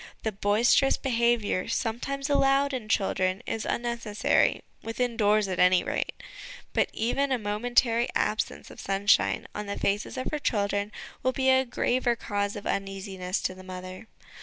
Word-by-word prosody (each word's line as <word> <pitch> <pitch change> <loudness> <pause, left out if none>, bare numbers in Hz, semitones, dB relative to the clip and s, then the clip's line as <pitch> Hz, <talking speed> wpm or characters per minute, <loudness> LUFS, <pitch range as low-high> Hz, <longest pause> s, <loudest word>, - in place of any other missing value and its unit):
The 220 - 0
boisterous 215 +7 +3
behaviour 235 -6 +1
sometimes 255 +4 -2
allowed 280 0 +3
in 230 -5 -4
children 190 0 0
is 225 - -3
unneces 235 -3 -3
sary - - +2 0.2
within 235 +1 -2
doors, 210 -2 +3
at 185 -1 -3
any 180 0 +5
rate; - - -2 0.6
but - - +2
even 270 +5 0
a 260 - +3
momentary 235 +2 +1
absence 215 - -1
of - - -12
sunshine 195 +1 +2
on 210 0 -5
the 200 - -4
faces 205 +1 -1
of 255 - -3
her 300 - -2
children 205 -4 0 0.3
will 255 - +1
be 265 0 +3
a 260 0 +4
graver 245 0 +1
cause 205 -3 -2
of 205 - -7
uneasiness 195 -1 -3
to - - -1
the 185 0 -12
mother. 185 +2 -8
220 Hz, 160 wpm, -27 LUFS, 200-245 Hz, 0.6 s, any